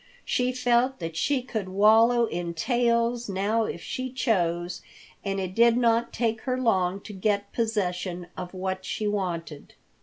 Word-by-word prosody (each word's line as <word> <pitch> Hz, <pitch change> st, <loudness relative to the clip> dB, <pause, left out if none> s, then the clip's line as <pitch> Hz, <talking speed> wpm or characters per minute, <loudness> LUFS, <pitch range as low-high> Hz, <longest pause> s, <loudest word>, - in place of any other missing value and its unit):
She 250 Hz, 0 st, +1 dB
felt 250 Hz, +1 st, +2 dB
that 165 Hz, -2 st, -5 dB
she 265 Hz, -, +1 dB
could 220 Hz, -6 st, -4 dB
wallow 225 Hz, +5 st, +5 dB
in 170 Hz, -4 st, -4 dB
tails 235 Hz, +3 st, +1 dB
now 205 Hz, +4 st, +1 dB
if 170 Hz, -, -5 dB
she 255 Hz, 0 st, -4 dB
chose, 175 Hz, -8 st, 0 dB, 0.4 s
and 195 Hz, -1 st, -2 dB
it 185 Hz, -1 st, -3 dB
did 235 Hz, +2 st, +5 dB
not 235 Hz, -1 st, +2 dB
take 225 Hz, -2 st, -1 dB
her 255 Hz, -1 st, -1 dB
long 195 Hz, -5 st, +1 dB
to 210 Hz, -, -9 dB
get 200 Hz, +1 st, -1 dB
possession 180 Hz, -6 st, -1 dB
of 180 Hz, -1 st, -6 dB
what 185 Hz, 0 st, -3 dB
she 210 Hz, +2 st, -3 dB
wanted. 170 Hz, -7 st, -4 dB
210 Hz, 155 wpm, -26 LUFS, 185-235 Hz, 0.4 s, wallow